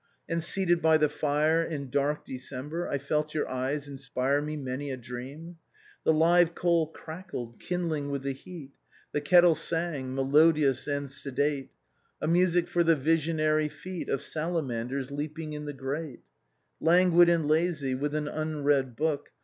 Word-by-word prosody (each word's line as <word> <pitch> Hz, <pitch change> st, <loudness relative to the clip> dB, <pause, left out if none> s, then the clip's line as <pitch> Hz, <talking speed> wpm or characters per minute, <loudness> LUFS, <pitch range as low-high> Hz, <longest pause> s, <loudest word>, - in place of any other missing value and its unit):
And, 165 Hz, -1 st, -1 dB
seated 175 Hz, -1 st, +1 dB
by 160 Hz, 0 st, +5 dB
the 150 Hz, -1 st, +2 dB
fire, 150 Hz, +2 st, +2 dB
in 140 Hz, -6 st, -5 dB
dark 145 Hz, +2 st, 0 dB
December, 135 Hz, +6 st, -5 dB
I 140 Hz, -, -1 dB
felt 150 Hz, +2 st, -2 dB
your 155 Hz, -, 0 dB
eyes 135 Hz, +3 st, -2 dB
inspire 135 Hz, 0 st, -1 dB
me 150 Hz, +1 st, -4 dB
many 135 Hz, +1 st, -4 dB
a 130 Hz, -, -3 dB
dream. 130 Hz, +8 st, -8 dB, 0.2 s
" -, -, -27 dB
The -, -, +5 dB
live 170 Hz, +2 st, +4 dB
coal 170 Hz, -2 st, +2 dB
crackled, 160 Hz, -7 st, -8 dB
kindling 165 Hz, -5 st, -2 dB
with 140 Hz, -1 st, -3 dB
the 140 Hz, -, -1 dB
heat, 140 Hz, 0 st, -10 dB, 0.4 s
The 145 Hz, -, -1 dB
kettle 175 Hz, +3 st, +6 dB
sang, 160 Hz, -5 st, -3 dB
melodious 145 Hz, 0 st, +3 dB
and 145 Hz, -1 st, -1 dB
sedate, 140 Hz, 0 st, -2 dB, 0.5 s
A -, -, -3 dB
music 175 Hz, +1 st, +3 dB
for 175 Hz, -, +2 dB
the 165 Hz, -1 st, +4 dB
visionary 155 Hz, 0 st, +1 dB
feet 185 Hz, +2 st, -7 dB
Of 140 Hz, 0 st, -1 dB
salamanders 140 Hz, -6 st, -3 dB
leaping 155 Hz, +2 st, -5 dB
in 150 Hz, 0 st, -5 dB
the 145 Hz, -, -4 dB
grate: 135 Hz, +1 st, -5 dB, 0.3 s
" -, -, -48 dB
Languid 175 Hz, 0 st, +6 dB
and 165 Hz, -3 st, +2 dB
lazy, 155 Hz, -3 st, +1 dB
with 145 Hz, +3 st, -2 dB
an 150 Hz, -1 st, -1 dB
unread 145 Hz, -5 st, 0 dB
book. 150 Hz, +1 st, -1 dB
150 Hz, 160 wpm, -28 LUFS, 140-165 Hz, 0.5 s, kettle